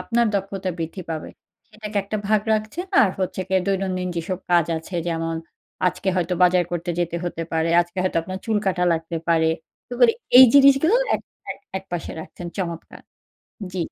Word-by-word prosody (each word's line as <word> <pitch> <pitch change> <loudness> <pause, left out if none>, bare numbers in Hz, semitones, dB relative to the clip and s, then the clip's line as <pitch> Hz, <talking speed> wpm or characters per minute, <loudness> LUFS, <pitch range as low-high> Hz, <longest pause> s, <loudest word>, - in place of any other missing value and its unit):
আপনার 235 0 +1
দক্ষতা 195 -1 -2
বৃদ্ধি 165 +3 -5
পাবে। 160 -1 -4 0.4
সেটাকে 215 -1 -8
একটা 200 +2 -4
ভাগ 215 -1 +4
রাখছেন। 215 - -2 0.2
আর 200 - +3
হচ্ছে 185 0 -2
গিয়ে 190 0 +2
দৈনন্দিন 190 -2 -1
যেসব 180 +2 -3
কাজ 175 -2 +4
আছে 170 +3 -11
যেমন, 165 0 -2 0.5
আজকে 185 +2 -1
হয়তো 180 0 0
বাজার 180 0 +4
করতে 175 0 -2
যেতে 170 -1 -1
হতে 165 -1 -3
পারে, 160 0 +1
আজকে 175 +2 -5
হয়তো 185 - -1
আপনার 185 +3 -6
চুল 220 -2 +1
কাটা 180 -2 +1
লাগতে 165 +1 -3
পারে। 160 -1 +3 0.4
তো 245 - -12
মানে 235 -2 +7 0.3
এই 260 - +12
জিনিসগুলো 275 +6 +6 0.2
এক - - -1 0.3
এক - - -6 0.2
একপাশে 175 -3 -6
রাখছেন। 175 +2 -9
চমৎকার। 170 -3 -5 0.7
জি। - - -5
185 Hz, 175 wpm, -22 LUFS, 170-210 Hz, 0.7 s, এই